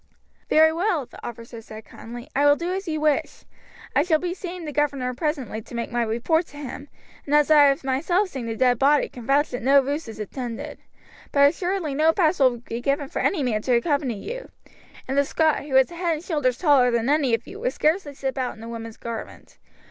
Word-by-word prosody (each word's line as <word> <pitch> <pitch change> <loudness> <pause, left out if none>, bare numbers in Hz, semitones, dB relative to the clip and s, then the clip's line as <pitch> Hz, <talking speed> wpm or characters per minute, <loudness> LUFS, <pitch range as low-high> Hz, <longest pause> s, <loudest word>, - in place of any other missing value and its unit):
"Very 315 +1 +5
well," 340 -4 0
the - - -15
officer 230 0 -8
said 220 -1 -11
kindly, 240 +1 -10
"I 285 +2 +4
will 290 - +6
do 345 +4 -3
as 385 0 -4
you 310 -1 -2
wish. 300 -2 0 0.5
I - - +5
shall 320 0 +2
be 355 +2 -3
seeing 360 -2 -7
the 300 - -4
governor 275 -4 -1
presently 265 -6 -3
to 235 - -11
make 235 - -3
my 240 0 0
report 240 +10 0
to 290 - -14
him; 285 0 -8 0.3
and 290 - 0
as 300 +1 +4
I 295 -2 +8
have 275 -1 +2
myself 330 +10 +1
seen 260 -7 -6
the 225 - -3
dead 250 -1 +2
body 285 +1 +3
can 240 -2 -11
vouch 285 +2 +2
that 245 - -4
no 275 +4 +5
ruse 285 +2 -2
is 220 -1 -9
intended. 230 +2 -6 0.5
But 280 0 +6
assuredly 350 -1 -2
no 315 +3 +3
pass 330 -2 +2
will 255 -3 +4
be 235 0 -6
given 275 +2 -1
for - - -4
any 325 -8 +1
man 220 -4 0
to 250 +2 +2
accompany 275 -1 0
you; - - -7 0.6
and 265 - -2
the 280 - +4
Scot, 310 0 +1
who 275 -3 -3
is 265 +5 +4
a - - -9
head 340 -2 0
and 310 - -8
shoulders 290 -8 0
taller 280 -7 +4
than 235 0 0
any 280 -5 +3
of 230 - -8
you, 405 - -10
would - - -1
scarcely 310 -2 0
slip 270 0 -3
out 250 -4 -3
in 220 - -11
a 230 - -7
woman's 230 -1 -7
garment. 230 -1 -8
280 Hz, 230 wpm, -24 LUFS, 245-315 Hz, 0.6 s, I